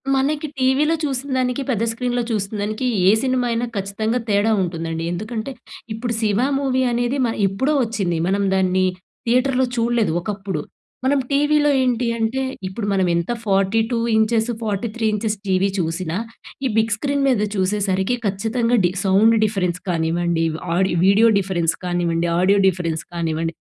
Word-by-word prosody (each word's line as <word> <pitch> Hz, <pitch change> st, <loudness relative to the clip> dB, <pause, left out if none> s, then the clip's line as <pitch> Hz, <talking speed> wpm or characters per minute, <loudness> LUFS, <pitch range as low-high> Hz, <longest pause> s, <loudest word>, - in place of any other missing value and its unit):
మనకి 290 Hz, +3 st, 0 dB
టీవీలో 270 Hz, +5 st, +2 dB
చూసినదానికి, 260 Hz, -2 st, -1 dB
పెద్ద 230 Hz, -4 st, 0 dB
స్క్రీన్‌‌లో 245 Hz, +1 st, -1 dB
చూసినదానికి, 210 Hz, +2 st, -2 dB, 0.2 s
ఏ -, -, +8 dB
సినిమా 255 Hz, -1 st, +1 dB
అయినా 230 Hz, +1 st, 0 dB
ఖచ్చితంగా 210 Hz, +4 st, -1 dB
తేడా 205 Hz, +2 st, +2 dB
ఉంటుందండి. 165 Hz, -2 st, -3 dB
ఎందుకంటే, 220 Hz, +7 st, -4 dB, 0.4 s
ఇప్పుడు 235 Hz, +2 st, -3 dB
'శివ' 210 Hz, 0 st, +1 dB, 0.2 s
మూవీ 260 Hz, -2 st, 0 dB
అనేది 240 Hz, +3 st, 0 dB
మ -, -, +1 dB, 0.2 s
ఎప్పుడో 260 Hz, +10 st, 0 dB
వచ్చింది. 195 Hz, -7 st, -1 dB
మనం 200 Hz, +1 st, +1 dB
దాన్ని 185 Hz, 0 st, +2 dB, 0.4 s
థియేటర్‌లో 255 Hz, +2 st, +2 dB
చూడలేదు, 235 Hz, -4 st, +1 dB
ఒకప్పుడు. 195 Hz, -4 st, -4 dB, 0.4 s
మనం 280 Hz, +1 st, +3 dB
టీవీలో 295 Hz, +1 st, +3 dB
ఏంటి 250 Hz, -1 st, +1 dB
అంటే 230 Hz, +4 st, -1 dB, 0.3 s
ఇప్పుడు 195 Hz, +3 st, -5 dB
మనం 190 Hz, -2 st, +2 dB
ఎంత 170 Hz, +6 st, -1 dB
42 220 Hz, +4 st, +1 dB, 0.2 s
ఇంచెస్, 220 Hz, +1 st, +2 dB
43 220 Hz, +1 st, -2 dB
ఇంచెస్ 210 Hz, 0 st, -1 dB
టీవీ 190 Hz, +1 st, +2 dB
చూసినా, 165 Hz, 0 st, -2 dB, 0.5 s
ఈ -, -, +3 dB
బిగ్ 220 Hz, -1 st, +2 dB
స్క్రీన్ 280 Hz, +5 st, -1 dB
మీద 250 Hz, -6 st, +2 dB
చూసేసరికి 195 Hz, +2 st, 0 dB
ఖచ్చితంగా, 225 Hz, +4 st, 0 dB
డి 175 Hz, -, +2 dB
సౌండ్ 205 Hz, +4 st, +4 dB
డిఫరెన్స్ 180 Hz, -4 st, 0 dB
కానివ్వండి, 170 Hz, 0 st, 0 dB, 0.3 s
ఆడియో 190 Hz, -1 st, +1 dB
వీడియో 200 Hz, +4 st, +5 dB
డిఫరెన్స్ 175 Hz, -4 st, 0 dB
కానివ్వండి, 175 Hz, -1 st, 0 dB
ఆడియో 195 Hz, +3 st, +4 dB
డిఫరెన్స్ 165 Hz, -4 st, -1 dB
కానివ్వండి, 165 Hz, -1 st, -2 dB
215 Hz, 140 wpm, -21 LUFS, 185-245 Hz, 0.5 s, ఏ